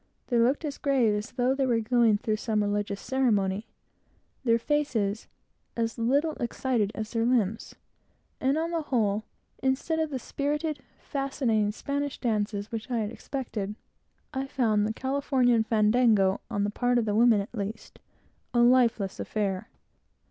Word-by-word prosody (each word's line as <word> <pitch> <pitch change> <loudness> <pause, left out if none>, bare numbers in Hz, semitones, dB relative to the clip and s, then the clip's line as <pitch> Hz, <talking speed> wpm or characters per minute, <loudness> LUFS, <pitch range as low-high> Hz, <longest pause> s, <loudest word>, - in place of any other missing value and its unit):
They 240 -2 +2
looked 260 +7 +2
as 290 -2 -5
grave 260 -6 +2
as 210 +4 -4
though 250 +1 +2
they 270 -1 0
were 235 -2 +2
going 225 -1 +3
through 215 +1 -1
some 215 -1 0
religious 205 -1 -1
ceremony, 210 -6 0 0.8
their 230 -2 +4
faces 230 -6 -1 0.5
as 230 0 -1
little 285 +7 +2
excited 235 -3 0
as 215 -1 -5
their 230 -1 0
limbs; 225 -3 0 0.6
and 270 +3 +1
on 330 +1 -1
the 335 -1 0
whole, 220 -7 0 0.4
instead 265 +5 0
of 315 -1 0
the 275 - -3
spirited, 295 +3 -2 0.2
fascinating 255 -7 0
Spanish 285 +5 -3
dances 210 -3 -1
which 225 +2 -5
I 245 - 0
had 215 -1 -1
expected, 225 -6 -5 0.6
I 265 +1 -2
found 220 -6 +1
the 220 - -2
Californian 260 -2 +2
fandango, 215 -3 +3
on 205 - -1
the 205 - 0
part 245 +3 +1
of 235 - +1
the 210 - 0
women 225 0 +5
at 200 +4 -5
least, 210 0 -6 0.6
a 240 - +5
lifeless 240 -5 +3
affair. 195 -3 -2
235 Hz, 155 wpm, -27 LUFS, 210-265 Hz, 0.8 s, women